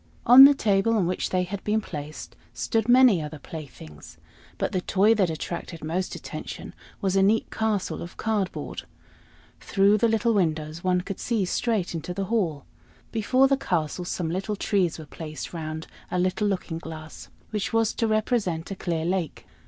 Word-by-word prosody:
On 255 +3 +11
the 285 0 +7
table 210 -1 +2
on 200 -5 +2
which 180 +2 -1
they 185 -1 +1
had 190 +2 -6
been 215 +1 +1
placed 150 -6 -8 0.2
stood 225 0 -1
many 245 -8 +6
other 150 +1 -6
playthings, 130 - -10 0.4
but - - -1
the 185 - -1
toy 200 +5 +3
that 195 -5 +2
attracted 165 +1 -5
most 175 +4 -2
attention - - -7 0.3
was 195 -2 0
a 195 - +4
neat 210 +3 +2
castle 220 -3 -1
of 170 - -9
cardboard. 210 -4 -2 0.8
Through 200 +1 +3
the 235 - +4
little 225 +1 +2
windows 160 -4 -1
one 180 -1 +2
could 195 +1 -6
see 225 -5 0
straight 210 -1 -1
into 165 +2 -5
the 195 - -2
hall. 165 -11 0 0.5
Before 255 +4 +3
the 275 0 +2
castle 175 - -1
some 175 -2 -3
little 195 +4 -2
trees 190 -4 0
were 160 - -9
placed 155 +1 -7
round 160 -1 -5 0.2
a - - -2
little 185 +4 +1
looking 180 -4 -2
glass, 160 -1 -9 0.2
which 210 -2 -2
was 225 -1 +2
to 230 - 0
represent 215 -6 0
a - - -3
clear 165 -3 -2
lake. 175 -3 -2
185 Hz, 175 wpm, -25 LUFS, 165-215 Hz, 0.8 s, On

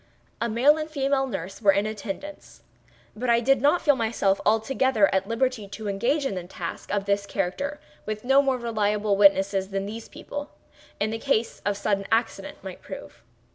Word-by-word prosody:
A 235 - 0
male 260 +7 +4
and 310 0 -4
a - - -24
female 275 -2 +1
nurse 195 -4 -6
were 200 -3 +6
in 200 - +1
attendance; 215 - -7 0.5
but 245 +3 -3
I 235 0 +5
did 270 +2 +3
not 295 +6 +3
feel 290 -3 +5
myself 220 -5 +1
altogether 225 0 +3
at 190 0 +1
liberty 230 -2 -1
to 210 +2 -7
engage 250 +9 0
in 195 -8 -1
a 175 - -10
task - - -6
of 200 -1 0
this 200 0 0
character 245 +11 -2 0.3
with 215 0 -4
no 270 +2 +6
more 270 -2 +1
reliable 210 -3 0
witnesses 195 -1 +4
than 195 0 -2
these 220 +2 -7
people, 290 0 -7 0.5
in 215 +1 0
case 235 -3 0
of 205 -1 0
sudden 200 -1 -1
accident, 225 +2 -1
might - - -8
prove. - - -10
220 Hz, 180 wpm, -25 LUFS, 200-265 Hz, 0.5 s, were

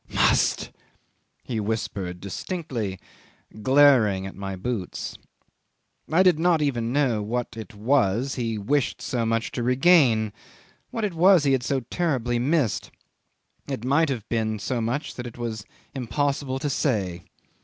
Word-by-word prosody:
Must!" - - +2 0.7
he 115 -3 -3
whispered 100 -4 -3
distinctly, 110 - -4 0.6
glaring 125 -7 +5
at 95 - -6
my 95 -1 -5
boots. 95 0 -4 1.0
'I 175 +4 +5
did 180 -4 +4
not 170 -1 +3
even 120 -6 0
know 130 -6 +1
what 120 +2 -3
it 110 0 -9
was 120 +2 +1
he 115 -3 -2
wished 135 +7 0
so 115 -3 -2
much 115 0 0
to 120 - -3
regain, 125 - +4 0.6
what 225 -2 -2
it 200 - -3
was 175 0 +5
he 140 - +2
had 135 -2 +2
so 130 +2 -1
terribly 125 -4 -1
missed. 135 -2 0 0.8
It 130 -4 -4
might 145 +4 +3
have 120 -6 -4
been 110 -2 -1
so 120 +4 -2
much 125 +7 -2
that 120 -1 -6
it 120 - -10
was 110 -3 -4 0.3
impossible 135 +1 -1
to 145 +2 -2
say. 95 - -1
120 Hz, 145 wpm, -25 LUFS, 110-145 Hz, 1.0 s, glaring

